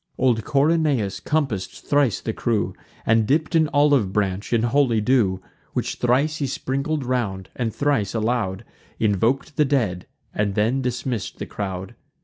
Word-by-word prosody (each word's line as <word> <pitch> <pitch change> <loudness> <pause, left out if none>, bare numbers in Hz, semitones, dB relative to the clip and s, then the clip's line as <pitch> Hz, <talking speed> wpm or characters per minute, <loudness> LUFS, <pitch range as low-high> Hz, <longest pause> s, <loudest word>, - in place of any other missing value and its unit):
Old 120 -4 +2
Corynaeus 140 - +1
compass'd 135 -12 0 0.2
thrice 145 -7 +2
the 110 - -3
crew, 110 -2 0 0.3
And 110 -1 +3
dipp'd 155 +6 +1
an 160 -2 +4
olive 145 -8 +3
branch 100 -1 -1
in 115 -1 +2
holy 120 -2 +3
dew; 105 -5 +2 0.3
Which - - -2
thrice 135 +6 +2
he 140 - -1
sprinkled 140 +3 -2
round, 110 -7 -2
and 115 -3 -1
thrice 115 -7 0
aloud 110 -4 -1 0.3
Invok'd 115 - +1
the 150 - +4
dead, 115 -11 0 0.3
and 100 -1 -1
then 115 +6 +1
dismissed 125 -4 -3
the - - -5
crowd. 95 -2 -5
120 Hz, 145 wpm, -23 LUFS, 105-140 Hz, 0.3 s, an